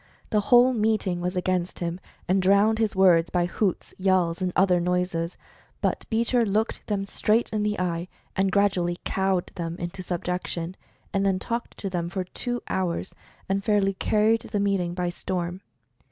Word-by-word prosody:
The 210 - +3
whole 245 +4 +5
meeting 210 -5 +1
was 180 +1 -2
against 180 -1 -1
him, 170 +1 -3 0.3
and 190 +1 +3
drowned 200 +4 +4
his 220 -3 +1
words 175 -3 +5
by 175 -1 +1
hoots, 185 +2 -1
yells; 185 -2 +2
and 185 -1 0
other 180 -1 +4
noises. 180 -1 -1 0.4
But - - -1
Beecher 235 +2 +2
looked 215 +1 -1
them 200 -2 -1
straight 220 +3 +1
in 215 - 0
the 210 -1 0
eye, 175 -1 -1 0.3
and 190 0 +2
gradually 180 -3 +2
cowed 190 -2 0
them 165 -1 -4
into 175 +2 -5
sub 180 -2 -4
jection, 180 -1 -3 0.4
and 195 -1 +1
then 195 -1 +2
talked 235 +5 -4
to 200 - -4
them 170 -2 -2
for 185 +1 -2
two 245 +6 -4
hours, 185 0 -2 0.3
and 195 +1 0
fairly 200 -2 +2
carried 215 +3 +2
the 205 - -3
meeting 195 -4 0
by 180 -1 -1
storm. 180 0 -3
190 Hz, 170 wpm, -26 LUFS, 175-210 Hz, 0.4 s, whole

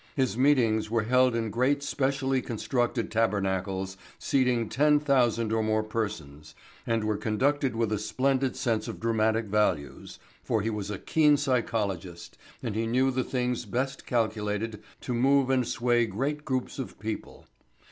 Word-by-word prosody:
His 130 -7 +1
meetings 120 -5 +3
were 115 -1 +1
held 125 +1 +3
in 115 -2 -1
great 135 +5 +1
specially 135 -2 0
constructed 120 0 -2
tabernacles 95 -3 -1 0.2
seating 125 -4 +1
ten 150 +5 +3
thousand 120 -6 +2
or 110 - +2
more 110 0 +1
persons 100 -10 -5 0.3
and 115 -1 +1
were 105 -1 0
conducted 130 +5 0
with 115 -1 0
a 105 - 0
splendid 130 +5 0
sense 115 -5 -1
of - - -6
dramatic 110 0 +1
values 100 -9 -1 0.3
for 110 -3 0
he 115 - -1
was 105 -2 -4
a 105 - -3
keen 150 +3 +3
psychologist 105 - -2 0.3
and 115 -4 -2
he 115 +1 -1
knew 130 +3 +2
the 130 0 0
things 125 -2 -2
best 130 +6 -3
calculated 110 -2 -1 0.2
to 125 - -3
move 135 +2 +3
and 130 -3 +2
sway 120 -1 +1
great 140 +8 -3
groups 130 +1 -2
of 130 - -6
people. 110 +2 -6
115 Hz, 155 wpm, -28 LUFS, 110-130 Hz, 0.3 s, meetings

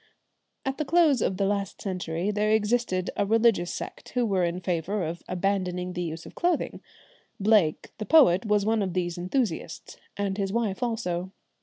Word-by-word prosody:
At 270 +2 -2
the - - +1
close 300 -4 +3
of 190 - 0
the 200 - +1
last 200 -1 -2
century 180 -1 -2
there 210 +1 0
existed 215 -3 +1
a - - +1
religious 220 -4 +3
sect - - -7
who 245 -1 +2
were 195 -4 +1
in 170 +1 -1
favour 180 +3 -1
of 165 +2 -4
abandoning 180 -1 -1
the 180 - -3
use 165 -1 -5
of - - -11
clothing. 345 -2 -1 0.6
Blake, 200 -6 +2
the 215 - -3
poet, 255 - +6
was 210 -2 +1
one 220 0 +2
of 190 -3 -2
these 175 -1 -1
enthusiasts, 180 -3 -3 0.2
and 200 0 -2
his 195 -1 -1
wife 220 -2 -1
also. 190 -7 -2
195 Hz, 175 wpm, -27 LUFS, 180-220 Hz, 0.6 s, poet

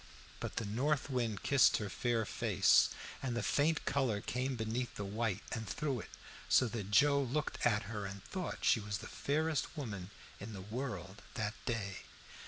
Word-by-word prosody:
But - - -4
the 115 - -1
north 140 +7 0
wind 115 -6 -1
kissed 140 -2 +5
her 105 - -3
fair 115 +3 0
face - - +4 0.3
and 125 -3 -2
the - - -1
faint 155 +2 +2
color 130 -7 +1
came 125 +5 -2
beneath 115 +2 -2
the 105 - -4
white 105 0 -1
and 110 -3 -3
through 135 +3 -1
it, - - -8 0.4
so 130 - +6
that 105 -4 -4
Joe 140 +6 +5
looked 140 +4 -2
at 105 -3 +2
her 105 0 -4
and 95 0 -8
thought 185 -2 -4
she - - +5
was 105 -1 -3
the - - -8
fairest 155 +2 -1
woman 100 -10 -4 0.3
in 105 +3 -7
the 95 - -6
world 105 -3 -5
that 105 -2 -1
day. 100 -6 -1
115 Hz, 180 wpm, -35 LUFS, 105-135 Hz, 0.4 s, so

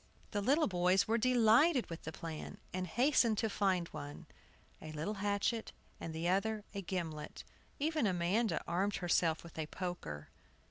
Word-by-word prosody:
The 205 - 0
little 285 +9 +3
boys 180 +1 +3
were 230 +2 +2
delighted 250 +4 +5
with 165 - -8
the 160 - -3
plan, 160 -1 -6 0.2
and 185 0 -2
hastened 240 - +3
to 225 - +1
find, 185 -4 +1
one, 145 0 -8 0.6
a 155 - -7
little 155 +7 -2
hatchet, 205 +2 -1 0.3
and 165 - -5
the 160 +2 -2
other 210 +3 +1
a 200 - -3
gimlet. 165 -5 -4 0.3
Even 305 -4 +1
Amanda 185 +2 +1
armed 195 +4 +1
herself 170 -2 +1
with 165 -1 -10
a 155 - -2
poker. 165 - -5
190 Hz, 155 wpm, -35 LUFS, 170-220 Hz, 0.6 s, delighted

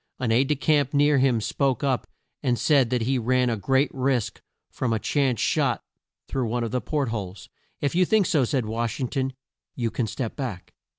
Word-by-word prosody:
An 125 -3 -1
aide 125 +4 +4
de 150 - +1
camp 145 0 +1
near 145 0 +4
him 130 -3 +3
spoke 130 +5 0
up 135 -3 0 0.3
and 125 -4 +1
said 135 +1 +3
that 125 -2 0
he 130 +2 +1
ran 125 +1 +2
a - - 0
great 135 +6 +1
risk 130 -4 -1 0.3
from 120 -3 -1
a - - +1
chance 130 0 0
shot - - +1 0.4
through 130 -3 -1
one 120 +2 -1
of 115 - -3
the 125 0 -1
port 145 -5 -1
holes. 100 -4 -6 0.3
"If 140 - 0
you 180 +2 +4
think 210 +2 +3
so," 150 -6 +2
said 125 -1 0
Wash 115 +3 -2
ing 130 -3 -1
ton, 135 -2 -2 0.4
"you 115 -3 -1
can 120 - -1
step 110 +2 -4
back." 120 -10 -6
130 Hz, 210 wpm, -25 LUFS, 115-140 Hz, 0.4 s, aide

